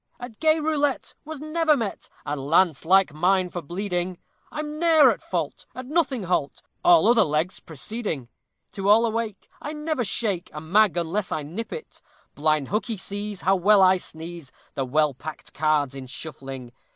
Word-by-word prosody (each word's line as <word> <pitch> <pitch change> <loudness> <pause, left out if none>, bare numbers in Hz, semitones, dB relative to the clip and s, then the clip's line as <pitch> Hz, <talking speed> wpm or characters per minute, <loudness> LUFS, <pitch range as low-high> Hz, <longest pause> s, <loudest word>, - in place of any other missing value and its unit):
At 245 -3 -9
gay 315 0 +3
roulette 295 -3 0
was 310 -1 -7
never 310 0 +2
met 220 -5 -4 0.2
A 145 - -2
lance 155 +3 +2
like 190 -2 +4
mine 180 +3 +2
for 175 - -4
bleeding! 180 +2 -3 0.3
I'm 300 0 -5
ne'er 325 -3 +6
at - - -5
fault, - - -4
at 255 - -6
nothing 280 - 0
halt, 170 -6 -1 0.2
All 350 -5 +6
other 235 0 +6
legs 155 +4 -1
preceding. 160 - -5 0.4
To 195 -1 -2
all 225 +3 +6
awake, 225 -3 -3
I 295 - -5
never 300 -3 -2
shake 200 -4 -2
A 150 - -5
mag 185 +4 +3
unless 175 +4 -1
I 155 - -2
nip 180 +11 -6
it. 470 -1 -8 0.3
Blind 155 -2 +1
hookey 215 +2 -1
sees 205 +1 -5
how 190 +1 +3
well 195 +2 +5
I 185 0 +6
squeeze 165 -4 -5 0.2
The 135 - -2
well 150 +2 +2
packed 155 +4 -9
cards 150 -3 +1
in 135 -1 -8
shuffling. 135 -3 -7
190 Hz, 170 wpm, -24 LUFS, 155-240 Hz, 0.4 s, ne'er